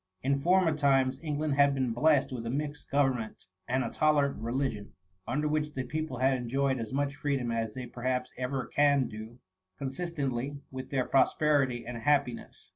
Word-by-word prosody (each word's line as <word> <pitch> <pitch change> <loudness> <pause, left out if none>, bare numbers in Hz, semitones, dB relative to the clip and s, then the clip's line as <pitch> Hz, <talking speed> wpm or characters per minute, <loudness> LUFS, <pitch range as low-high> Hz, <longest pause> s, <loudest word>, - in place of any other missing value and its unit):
In 140 +1 +2
former 175 +1 +3
times, 135 -2 +2
England 150 -1 -1
had 140 0 +4
been 130 -3 0
blessed 145 +3 +3
with 120 -3 -4
a - - -2
mixed 145 +3 -4
government 130 -6 0 0.2
and 130 +1 +1
a - - -4
tolerant 145 -5 +2
re 115 +1 -3
ligion, 125 -6 -2 0.3
under 150 +5 0
which 150 0 -1
the 130 - -1
people 155 0 -4
had 130 +2 +3
enjoyed 130 +2 0
as 115 -2 -5
much 140 +1 -1
freedon^ 130 -5 0
as 115 -2 -2
they 130 -1 -5
perhaps 125 +1 -2
ever 130 0 -2
can 140 0 +3
do, 110 +2 -9 0.4
consistently 140 -2 -3
with 130 0 -6
their 130 -3 0
prosperity 135 -3 +2
and 120 -1 -5
happiness. 140 -1 -1
135 Hz, 175 wpm, -30 LUFS, 125-145 Hz, 0.4 s, had